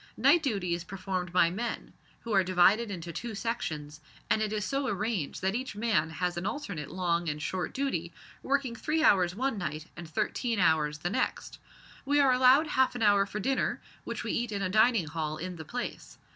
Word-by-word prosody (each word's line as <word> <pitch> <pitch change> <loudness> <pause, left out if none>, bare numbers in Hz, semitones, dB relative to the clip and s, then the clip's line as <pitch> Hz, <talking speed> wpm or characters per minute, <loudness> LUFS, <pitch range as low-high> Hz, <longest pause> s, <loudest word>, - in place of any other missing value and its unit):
Night 345 - +5
duty 200 - -1
is 170 -1 -3
performed 185 -1 -4
by 175 -2 +4
men, 230 +5 -4 0.3
who 230 - -4
are 195 -1 +5
divided 185 +5 +4
into 175 -3 -5
two 235 +2 -5
sections, 155 -10 -4 0.3
and 215 - +3
it 215 -1 0
is 210 -1 -1
so 275 0 -1
arranged 205 - -2
that 190 +1 +1
each 255 -1 -4
man 210 -7 +1
has 175 +2 -2
an 175 +3 -2
alternate 200 - -4
long 170 -2 0
and 150 0 -3
short 180 +3 -3
duty 215 -12 -2 0.3
working 270 -3 0
three 310 +6 0
hours 180 -6 +4
one 255 -1 -1
night 155 -3 -4
and 170 -2 -9
thirteen 230 - -1
hours 155 -4 +2
the 175 +4 -3
next. - - -2 0.4
We 285 +1 +2
are 275 -2 +5
allowed 255 +4 +6
half 260 -4 +2
an 240 - -2
hour 205 -1 +4
for 210 - -5
dinner, 265 +6 0 0.2
which - - -5
we - - -2
eat 235 -1 -1
in 200 -1 -2
a 185 - 0
dining 220 -1 +4
hall 155 0 -3
in 180 +1 -6
the 160 - -8
place. 245 +10 -6
195 Hz, 200 wpm, -29 LUFS, 170-235 Hz, 0.4 s, allowed